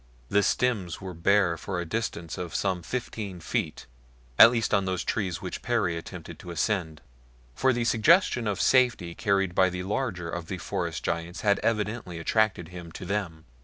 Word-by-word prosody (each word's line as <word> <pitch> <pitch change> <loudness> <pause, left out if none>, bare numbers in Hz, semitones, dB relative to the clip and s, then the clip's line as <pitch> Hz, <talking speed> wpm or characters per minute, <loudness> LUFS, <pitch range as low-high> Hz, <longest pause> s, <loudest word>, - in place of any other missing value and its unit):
The 105 - +4
stems 100 -7 0
were 95 -1 -7
bare 90 0 +2
for 95 -2 -3
a 90 - -3
distance 85 -4 -3
of 90 -2 -5
some 95 -3 0
fifteen 105 -2 -5
feet 80 - -3 0.5
at - - +12
least 115 -2 -1
on 100 -2 +3
those 95 -2 -1
trees 95 -5 -2
which 90 - -5
Perry 105 -8 0
attempted 85 - -8
to - - -10
ascend, 85 -2 -1 0.5
for 130 - +2
the 120 -1 0
suggestion 120 - +4
of 100 -2 -1
safety 120 -10 +3
carried 95 -2 +1
by 95 0 +4
the 90 0 -4
larger 100 -4 -2
of 85 0 -5
the 95 - -4
forest 85 -7 -3
giants 85 +1 -3
had 100 -1 +3
evidently 105 -4 -1
attracted 95 0 +1
him 90 -2 -9
to - - -7
them. 90 -5 -3
95 Hz, 175 wpm, -27 LUFS, 85-110 Hz, 0.5 s, at